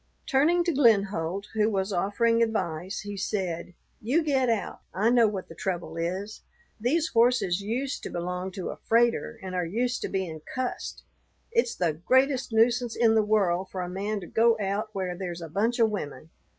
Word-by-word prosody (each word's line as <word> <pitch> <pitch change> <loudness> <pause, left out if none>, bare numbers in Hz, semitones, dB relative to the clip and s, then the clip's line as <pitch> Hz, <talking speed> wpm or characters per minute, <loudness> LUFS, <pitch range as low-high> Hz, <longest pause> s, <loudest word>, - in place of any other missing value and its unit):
Turning 315 +6 +3
to 340 -1 0
Glenholdt, 200 - +2
who 215 0 +2
was 195 -1 -1
offering 230 +5 +2
advice, 185 -5 -1
he 205 0 -6
said, 180 -3 -3 0.3
"You 275 +10 +2
get 265 -4 +2
out. 225 -3 -1 0.2
I 215 +5 +3
know 240 -2 +5
what 200 -3 -4
the - - -10
trouble 180 -2 -4
is: 185 +6 -3 0.4
these 305 +8 +1
horses 230 -6 +3
used 250 +7 -2
to - - -6
belong 180 +2 -3
to 185 - -4
a - - -9
freighter 235 0 +1
and 185 -1 -5
are 180 -1 0
used 240 +8 -1
to - - -3
being 180 -5 -3
cussed. 255 -1 -4 0.5
It's 470 0 +1
the 170 -3 +1
greatest 260 - +2
nuisance 235 +1 +2
in 230 -2 +4
the 220 - +5
world 195 -4 +1
for 185 - -4
a - - -4
man 200 +3 -2
to - - -7
go 230 +4 +3
out 205 +2 -1
where 185 -2 -2
there's 175 -2 -5
a - - -5
bunch 220 +9 0
of 225 -2 +3
women. 160 -4 -6
210 Hz, 185 wpm, -27 LUFS, 185-235 Hz, 0.5 s, know